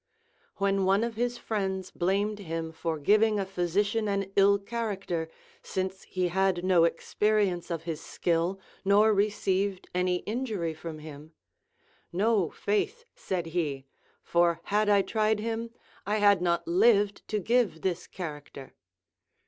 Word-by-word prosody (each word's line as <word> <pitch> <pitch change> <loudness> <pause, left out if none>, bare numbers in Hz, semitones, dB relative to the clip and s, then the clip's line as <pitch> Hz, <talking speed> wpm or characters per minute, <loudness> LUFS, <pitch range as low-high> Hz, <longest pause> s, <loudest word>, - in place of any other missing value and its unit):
AVhen 195 0 +2
one 195 +3 +3
of 235 -1 -3
his 240 +1 -1
friends 190 -5 -3
blamed 200 +4 0
him 165 -3 -4
for 160 0 -3
giving 210 +7 +3
a 195 - -1
physician 200 +4 0
an 195 -1 -1
ill 200 0 +5
character, 200 -6 -3 0.3
since 190 0 -3
he 185 -1 0
had 190 -1 +1
no 180 -3 +5
experience 190 +1 0
of 165 -2 -3
his 165 -2 -4
skill 175 +3 -1 0.2
nor 205 +2 +5
received 200 -1 0
any 180 0 +1
injury 215 -8 -2
from 160 0 -7
him; 155 0 -11 0.8
No, 200 -1 +2
faith, 415 - -2
said 180 -3 -3
he, 145 -6 -2 0.4
for 170 -1 +2
had 210 +1 +1
I 200 -1 +5
tried 215 +1 +1
him, 230 +1 -3 0.4
I 210 - +1
had 205 -3 +4
not 170 -1 0
lived 205 +2 +3
to 215 - -1
give 220 -5 +1
this 180 -2 -2
charac 150 -6 -7
ter. 135 -1 -10
195 Hz, 140 wpm, -28 LUFS, 170-210 Hz, 0.8 s, ill